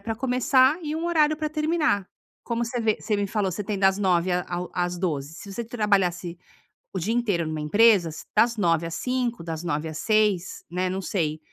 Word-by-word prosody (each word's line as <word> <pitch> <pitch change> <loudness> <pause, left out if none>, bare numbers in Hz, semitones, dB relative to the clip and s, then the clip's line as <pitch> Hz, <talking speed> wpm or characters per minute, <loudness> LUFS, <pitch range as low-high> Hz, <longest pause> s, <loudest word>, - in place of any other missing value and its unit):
pra 225 +2 -3
começar 260 +3 +3
e 305 -1 -3
um 330 +1 -2
horário 310 -3 +3
pra 305 0 -2
terminar. 305 - 0 0.4
Como 235 0 -1
você 240 +1 -3
vê 220 -2 +1
você 210 -1 -1
me 205 0 0
falou, 200 -1 -1
você 205 - -4
tem 205 0 -2
das 195 0 +3
9h 185 -2 +2
ao 180 0 -3
às 180 0 -1
12h. 155 -4 -2
Se 200 +4 -9
você 235 +4 -4
trabalhasse 195 -6 0 0.6
o - - 0
dia 205 +7 -1
inteiro 205 -8 0
numa 155 -1 -3
empresa, 200 +2 +4 0.3
das 235 0 +4
9h 170 -4 +1
às 165 - -5
17h, 245 -5 -2
das 165 0 -5
9h 160 -2 -2
às 155 -1 -6
18h, 210 -5 +1
né. 180 +1 -1
Não 190 +1 -3
sei. 160 -5 -2
200 Hz, 205 wpm, -25 LUFS, 175-235 Hz, 0.6 s, empresa